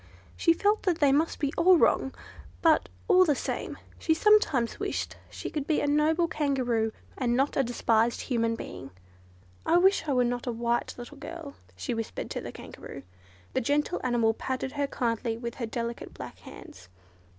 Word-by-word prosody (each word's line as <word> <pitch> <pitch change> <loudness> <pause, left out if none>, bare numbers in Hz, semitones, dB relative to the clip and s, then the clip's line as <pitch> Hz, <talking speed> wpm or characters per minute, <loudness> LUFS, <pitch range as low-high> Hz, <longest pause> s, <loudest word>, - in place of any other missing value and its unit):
She 335 - +3
felt 410 +5 +2
that 355 -4 +1
they 290 -4 +4
must 310 +4 +2 0.2
all 370 +1 +7
be - - +3
wrong; 265 - +3 0.5
but, 320 -2 +4 0.2
all 370 -3 +7
the 300 -5 +2
same, - - -4 0.2
she 320 - +2
sometimes 320 - +3
wished - - -3
she - - -6
could 295 -2 -3
be 310 - +2
a - - 0
noble 310 +4 +3
Kangaroo, 255 -8 0 0.3
and 240 -3 +1
not 275 +2 +1
a - - +4
despised 235 -1 +1
human 230 -3 0
being. 135 -10 -8 0.7
"I 340 - +4
wish 380 -2 +4
I 285 - +1
were 250 -1 +3
not 245 +1 -2
a - - +1
white 235 +1 -1
little 245 +4 -9
girl," 305 -1 -8 0.2
she 90 - -3
whispered 225 -1 -4
to - - -3
the - - -6
Kangaroo. - - -10 0.5
The 260 - +1
gentle 290 +7 0
animal 235 -3 +2
patted 260 +3 -3
her 285 0 -1
kindly 230 -3 -1
with 235 0 -5
her 230 - -1
delicate 235 0 -5
black - - -9
hands. 95 -1 -13
265 Hz, 180 wpm, -28 LUFS, 235-315 Hz, 0.7 s, all